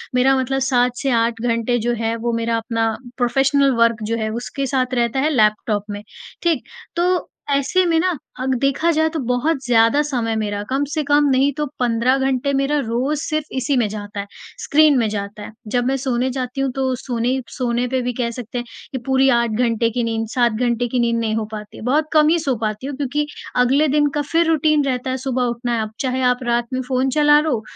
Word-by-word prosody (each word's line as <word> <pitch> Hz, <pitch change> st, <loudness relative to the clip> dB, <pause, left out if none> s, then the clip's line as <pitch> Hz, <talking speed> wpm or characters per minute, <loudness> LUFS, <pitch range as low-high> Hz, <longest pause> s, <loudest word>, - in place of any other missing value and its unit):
मेरा 265 Hz, +2 st, +4 dB
मतलब 270 Hz, +1 st, -1 dB
7 250 Hz, -2 st, +2 dB
से 275 Hz, -, 0 dB
8 230 Hz, 0 st, -1 dB
घंटे 235 Hz, 0 st, 0 dB
जो 240 Hz, +2 st, 0 dB
है 225 Hz, 0 st, -1 dB
वो 235 Hz, -1 st, 0 dB
मेरा 230 Hz, 0 st, 0 dB
अपना 225 Hz, 0 st, -1 dB, 0.3 s
प्रोफ़ेशनल 270 Hz, +2 st, +3 dB
वर्क 230 Hz, -1 st, +2 dB
जो 230 Hz, +2 st, -1 dB
है, 220 Hz, -1 st, -2 dB
उसके 240 Hz, +5 st, -4 dB
साथ 255 Hz, -1 st, 0 dB
रहता 240 Hz, +1 st, +1 dB
है 295 Hz, +3 st, +2 dB
लैपटॉप 215 Hz, -5 st, +1 dB
में। 205 Hz, 0 st, -5 dB, 0.4 s
ठीक? 330 Hz, -6 st, +1 dB, 0.3 s
तो 355 Hz, +1 st, +1 dB, 0.2 s
ऐसे 280 Hz, +7 st, +2 dB
में 330 Hz, -2 st, +2 dB
ना 365 Hz, +1 st, +1 dB, 0.3 s
अग 260 Hz, 0 st, 0 dB
देखा 275 Hz, +5 st, +1 dB
जाए 315 Hz, 0 st, +2 dB
तो 320 Hz, -, -4 dB
बहुत 250 Hz, +5 st, 0 dB
ज़्यादा 230 Hz, +3 st, +4 dB
समय 240 Hz, -6 st, -1 dB
मेरा 205 Hz, -2 st, -2 dB
कम 270 Hz, +2 st, 0 dB
से 310 Hz, -, 0 dB
कम 290 Hz, +1 st, +3 dB
नहीं 270 Hz, +2 st, +3 dB
तो 300 Hz, +1 st, -2 dB
15 245 Hz, +2 st, +2 dB
घंटे 270 Hz, 0 st, 0 dB
मेरा 275 Hz, +2 st, +1 dB
रोज़ 260 Hz, +4 st, -1 dB
सिर्फ 310 Hz, -2 st, -2 dB
इसी 260 Hz, +2 st, 0 dB
में 230 Hz, -3 st, +2 dB
जाता 205 Hz, 0 st, -6 dB
है, 200 Hz, -, -3 dB, 0.4 s
स्क्रीन 300 Hz, -1 st, +4 dB
में 230 Hz, -3 st, +2 dB
जाता 205 Hz, 0 st, -5 dB
है। -, -, -8 dB, 0.2 s
जब 245 Hz, +2 st, 0 dB
मैं 270 Hz, +2 st, +1 dB
सोने 255 Hz, -1 st, -1 dB
जाती 255 Hz, +1 st, -3 dB
हूँ 270 Hz, -2 st, 0 dB
तो 265 Hz, -1 st, 0 dB
सोने 250 Hz, +1 st, -1 dB
सोने 245 Hz, -1 st, -1 dB
पे 260 Hz, +1 st, -1 dB
भी 250 Hz, 0 st, -2 dB
कह 240 Hz, -1 st, -1 dB
सकते 245 Hz, 0 st, -7 dB
हैं 240 Hz, -, -3 dB, 0.3 s
कि 265 Hz, -, -3 dB
पूरी 265 Hz, 0 st, +3 dB
8 235 Hz, -2 st, +2 dB
घंटे 230 Hz, 0 st, +1 dB
की 240 Hz, +1 st, -2 dB
नींद, 225 Hz, -1 st, -2 dB
7 240 Hz, -2 st, +3 dB
घंटे 240 Hz, +1 st, 0 dB
की 245 Hz, +1 st, -1 dB
नींद 235 Hz, -1 st, +1 dB
नहीं 220 Hz, -1 st, -1 dB
हो 220 Hz, -1 st, -1 dB
पाती 210 Hz, -1 st, -8 dB
है। -, -, -9 dB
बहुत 295 Hz, +5 st, +1 dB
कम 305 Hz, -1 st, +5 dB
ही 335 Hz, +1 st, +3 dB
सो 275 Hz, -5 st, 0 dB
पाती 215 Hz, +4 st, -3 dB
हूँ 285 Hz, -, -4 dB
क्योंकि 290 Hz, +1 st, -1 dB, 0.3 s
अगले 265 Hz, +5 st, +3 dB
दिन 295 Hz, +1 st, +2 dB
का 295 Hz, -, +1 dB
फिर 335 Hz, 0 st, +3 dB
रूटीन 305 Hz, -1 st, +3 dB
रहता 260 Hz, -1 st, -2 dB
है। 260 Hz, -, -1 dB
सुबह 260 Hz, -1 st, -1 dB
उठना 240 Hz, 0 st, -2 dB
है, 225 Hz, -, 0 dB
अब 215 Hz, -1 st, -4 dB
चाहे 260 Hz, -1 st, -1 dB
आप 250 Hz, +1 st, +2 dB
रात 240 Hz, 0 st, 0 dB
में 255 Hz, -, 0 dB
फ़ोन 260 Hz, 0 st, +1 dB
चला 295 Hz, 0 st, +6 dB
लो, 285 Hz, -8 st, 0 dB
250 Hz, 225 wpm, -20 LUFS, 230-275 Hz, 0.4 s, चला